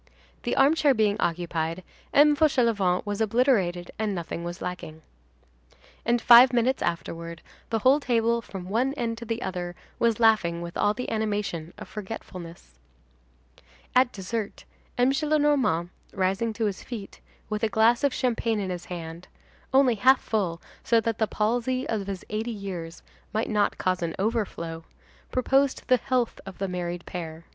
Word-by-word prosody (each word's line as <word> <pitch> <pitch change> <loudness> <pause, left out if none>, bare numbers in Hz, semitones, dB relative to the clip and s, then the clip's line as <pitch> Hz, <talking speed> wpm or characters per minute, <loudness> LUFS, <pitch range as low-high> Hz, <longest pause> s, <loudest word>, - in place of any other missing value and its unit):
The - - -1
armchair 290 -1 +4
being 210 -2 +2
occupied, 170 0 -2 0.3
M. 295 +1 +6
Fauchelevent 230 - +2
was 205 +1 -3
obliterated; 210 -7 +1
and 215 -2 -1
nothing 170 -1 -5
was 175 +1 -5
lacking. 165 -3 -6 1.0
And, 240 +1 +2
five 240 +2 +8
minutes 245 +2 +1
afterward, 170 -1 -4 0.3
the 225 - +1
whole 260 +6 +4
table 235 -3 +1
from 190 -5 -8
one 250 +8 0
end 230 -4 -2
to 235 - -7
the 230 +1 -3
other, 175 -1 -4 0.2
was 230 -2 +2
laughing 215 -7 +3
with 170 0 -7
all 205 0 +2
the 250 - -4
animation 205 -7 -2
of 215 - -9
forgetfulness. 180 - -9 1.1
At 250 -1 +4
dessert, 205 +2 -5 0.3
M. 250 +2 +4
Gillenormand, 285 - +2 0.2
rising 195 +4 0
to 220 +1 -1
his 200 -3 -2
feet, 220 -6 -8 0.3
with 215 0 -3
a 225 - +1
glass 225 +4 +3
of 280 - +3
champagne 230 -4 0
in 190 -2 -2
his 175 -1 -5
hand—only 180 +10 -2
half 255 +4 +5
full 185 -7 -1 0.2
so 230 - +4
that 225 -1 -2
the 220 - +2
palsy 245 +5 0
of 210 -3 -2
his 195 -2 -5
eighty 220 +3 -2
years 185 -6 -6 0.3
might 220 +2 -1
not 210 -1 +1
cause 185 -1 0
an 165 -1 -2
overflow,—proposed 220 +6 -2
the 255 - +5
health 250 -1 -1
of 190 - -8
the 195 - -2
married 175 -1 -4
pair. 165 -2 -7
215 Hz, 150 wpm, -26 LUFS, 180-240 Hz, 1.1 s, five